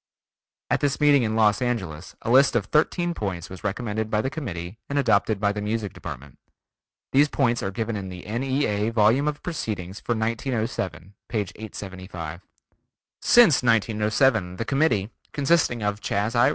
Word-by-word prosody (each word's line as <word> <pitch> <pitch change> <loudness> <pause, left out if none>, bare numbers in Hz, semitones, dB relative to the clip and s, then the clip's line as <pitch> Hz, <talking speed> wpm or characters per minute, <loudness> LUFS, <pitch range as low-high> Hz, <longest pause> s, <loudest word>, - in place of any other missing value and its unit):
At - - +3
this 140 -1 0
meeting 145 -2 +5
in 110 -2 0
Los 105 -1 +3
Angeles 95 -11 -3
a 115 - -1
list 135 0 +5
of 110 -5 +1
thirteen 170 - +1
points 95 - -4
was 95 - -9
recommended 110 +1 -2
by 105 - +1
the 130 - -2
committee 95 - -6
and 140 - -1
adopted 110 -5 +2
by 100 0 +2
the 105 0 -4
Music 105 -1 -2
Department. 65 +1 -9 0.7
These 145 +2 +5
points 120 -5 +1
are 95 - -2
given 110 +2 -3
in 95 -2 -5
the 90 -1 -9
N.E.A. 115 -2 0
Volume 115 +5 +3
of 150 -1 -3
Proceedings 105 - -4
for 120 - -1
1907, 110 - -2 0.2
p. 115 - -2
875. 95 -5 -6 0.8
Since 230 - +6
1907 110 -3 +2
the 115 - -4
committee 125 -7 +1 0.2
(consisting 140 -6 +2
of 105 0 -1
Chas. 105 +3 -1
I. 120 +1 +5
110 Hz, 160 wpm, -24 LUFS, 100-130 Hz, 0.8 s, Since